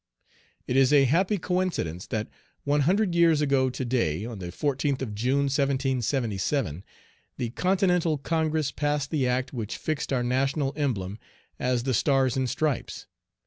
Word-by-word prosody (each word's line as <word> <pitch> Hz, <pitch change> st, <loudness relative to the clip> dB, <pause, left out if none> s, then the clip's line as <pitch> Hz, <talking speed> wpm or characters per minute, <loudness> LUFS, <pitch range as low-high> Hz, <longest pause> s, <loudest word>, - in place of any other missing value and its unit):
It 125 Hz, -, -2 dB
is 135 Hz, 0 st, +5 dB
a 145 Hz, -2 st, +6 dB
happy 180 Hz, -, +2 dB
coincidence 180 Hz, -, -2 dB
that 110 Hz, -1 st, -2 dB, 0.4 s
one 145 Hz, +1 st, +2 dB
hundred 200 Hz, -1 st, +2 dB
years 170 Hz, -3 st, +4 dB
ago 135 Hz, -3 st, +2 dB
to 130 Hz, +1 st, -4 dB
day, 110 Hz, -7 st, 0 dB
on 115 Hz, -3 st, -7 dB
the 90 Hz, -, -5 dB
14th 135 Hz, -, -1 dB
of 110 Hz, -5 st, -5 dB
June, 130 Hz, +7 st, +1 dB
1777, 130 Hz, -, 0 dB, 0.5 s
the 120 Hz, -2 st, -3 dB
Continental 180 Hz, -1 st, +1 dB
Congress 155 Hz, 0 st, 0 dB
passed 145 Hz, -1 st, -1 dB
the 140 Hz, -5 st, +1 dB
act 130 Hz, +2 st, -1 dB
which 115 Hz, -3 st, -4 dB
fixed 155 Hz, -2 st, -3 dB
our 125 Hz, -2 st, +1 dB
national 135 Hz, +3 st, 0 dB
emblem 110 Hz, -9 st, -2 dB, 0.4 s
as 125 Hz, -1 st, 0 dB
the 130 Hz, 0 st, 0 dB
stars 135 Hz, +1 st, +2 dB
and 130 Hz, -1 st, 0 dB
stripes. 150 Hz, -1 st, -2 dB
135 Hz, 150 wpm, -26 LUFS, 125-150 Hz, 0.5 s, a